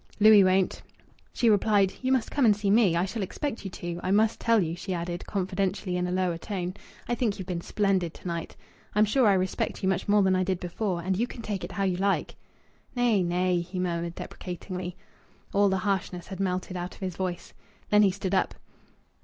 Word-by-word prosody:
"Louis 215 Hz, -1 st, +8 dB
won't." 185 Hz, 0 st, +2 dB, 0.5 s
She 240 Hz, -, +1 dB
replied: 205 Hz, -2 st, +4 dB
"You 260 Hz, 0 st, 0 dB
must 260 Hz, -4 st, +1 dB
come 285 Hz, -, +1 dB
and 215 Hz, -3 st, +6 dB
see 205 Hz, -1 st, 0 dB
me. 205 Hz, -6 st, +4 dB
I 175 Hz, +2 st, +2 dB
shall 220 Hz, +3 st, -4 dB
expect 230 Hz, +6 st, -4 dB
you 195 Hz, -, -4 dB
to. 175 Hz, -1 st, -5 dB
I -, -, -3 dB
must 215 Hz, +3 st, +3 dB
tell 230 Hz, -1 st, +3 dB
you," 165 Hz, -3 st, -1 dB
she 185 Hz, +1 st, -4 dB
added 175 Hz, 0 st, -4 dB
confidentially, 190 Hz, -1 st, -1 dB
in 180 Hz, 0 st, 0 dB
a -, -, -3 dB
lower 180 Hz, -2 st, 0 dB
tone, 185 Hz, -1 st, -4 dB, 0.3 s
"I -, -, 0 dB
think 235 Hz, -4 st, 0 dB
you've 190 Hz, -, -6 dB
been 175 Hz, -2 st, -3 dB
splendid 190 Hz, -3 st, 0 dB
to -, -, -9 dB
night. 170 Hz, -1 st, -4 dB, 0.4 s
I'm 210 Hz, +1 st, +5 dB
sure 235 Hz, +3 st, +3 dB
I 200 Hz, -, +6 dB
respect 185 Hz, 0 st, -1 dB
you 190 Hz, -, +3 dB
much 190 Hz, -, -1 dB
more 205 Hz, 0 st, +4 dB
than 190 Hz, -1 st, +3 dB
I 185 Hz, -, +2 dB
did 185 Hz, -1 st, -1 dB
before 180 Hz, 0 st, -3 dB
and 190 Hz, +1 st, 0 dB
you 235 Hz, +6 st, 0 dB
can 235 Hz, -, -9 dB
take 205 Hz, -4 st, -3 dB
it -, -, -6 dB
how 200 Hz, -, -1 dB
you 185 Hz, -2 st, +1 dB
like!" 195 Hz, +1 st, 0 dB, 0.6 s
"Nay! 240 Hz, -5 st, +3 dB
Nay!" 180 Hz, 0 st, +1 dB
he 180 Hz, +2 st, -7 dB
murmured 170 Hz, -1 st, -2 dB
deprecatingly. 180 Hz, 0 st, -6 dB, 0.6 s
All 200 Hz, 0 st, +4 dB
the 190 Hz, -, +1 dB
harshness 190 Hz, -2 st, -2 dB
had 190 Hz, -2 st, -8 dB
melted 185 Hz, -1 st, -2 dB
out 180 Hz, 0 st, -5 dB
of -, -, -19 dB
his 185 Hz, -3 st, -3 dB
voice. 180 Hz, -2 st, -4 dB, 0.4 s
Then 210 Hz, 0 st, +6 dB
he 200 Hz, -, +6 dB
stood 190 Hz, 0 st, -3 dB
up. 190 Hz, -, +1 dB
190 Hz, 220 wpm, -27 LUFS, 180-205 Hz, 0.6 s, Louis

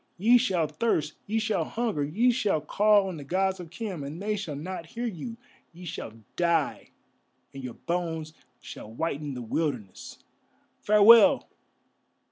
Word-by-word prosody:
Ye 235 Hz, +6 st, +5 dB
shall 185 Hz, -9 st, +1 dB
thirst, 155 Hz, -1 st, -1 dB
ye 215 Hz, +2 st, -1 dB
shall 220 Hz, -1 st, 0 dB
hunger, 225 Hz, -11 st, -2 dB
ye 215 Hz, +13 st, +2 dB
shall 210 Hz, -9 st, +1 dB
call 205 Hz, +6 st, +3 dB
on 180 Hz, -3 st, -5 dB
the 145 Hz, -, -8 dB
Gods 190 Hz, +5 st, 0 dB
of 175 Hz, -2 st, -8 dB
Khem, 185 Hz, -4 st, -5 dB
and 145 Hz, +4 st, -7 dB
they 210 Hz, +2 st, -1 dB
shall 180 Hz, -8 st, -5 dB
not 165 Hz, +3 st, -6 dB
hear 235 Hz, +8 st, -5 dB
you; 230 Hz, +2 st, -5 dB, 0.4 s
ye 180 Hz, +2 st, -11 dB
shall 115 Hz, -8 st, -6 dB, 0.2 s
die, 170 Hz, -3 st, 0 dB, 0.6 s
and 135 Hz, -1 st, -8 dB
your 125 Hz, -2 st, -6 dB
bones 165 Hz, -3 st, -3 dB, 0.3 s
shall 105 Hz, -, -10 dB
whiten 145 Hz, +1 st, -3 dB
the 125 Hz, -, -5 dB
wilderness. 120 Hz, -, -4 dB, 0.6 s
Farewell! 230 Hz, +6 st, +6 dB
175 Hz, 150 wpm, -27 LUFS, 150-215 Hz, 0.6 s, Farewell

